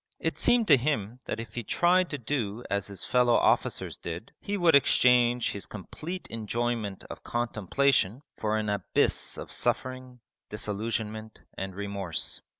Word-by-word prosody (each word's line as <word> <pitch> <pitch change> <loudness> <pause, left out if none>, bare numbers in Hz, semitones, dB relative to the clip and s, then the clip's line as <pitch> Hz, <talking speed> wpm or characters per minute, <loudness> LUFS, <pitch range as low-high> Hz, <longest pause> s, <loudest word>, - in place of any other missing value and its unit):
It - - -1
seemed 240 -3 +3
to 145 - +9
him 120 -4 -1
that - - -3
if 115 - -7
he 120 - -3
tried 180 - +3
to 145 - -3
do 120 -4 -2
as 100 -1 0
his 100 -3 -7
fellow 125 -1 +3
officers - - +1
did, 85 +5 -7
he 205 0 -3
would 175 -3 +4
exchange 125 -3 +4
his 100 - -5
complete 155 - -7
enjoyment 115 -2 -2
of - - -9
contemplation 120 - +1
for 110 0 0
an 110 -1 -1
abyss 100 -3 0
of - - -7
suffering, 130 -1 -2 0.3
disillusionment, 110 +1 -3
and 95 -1 -5
remorse. 100 -4 -3
115 Hz, 150 wpm, -28 LUFS, 105-130 Hz, 0.3 s, to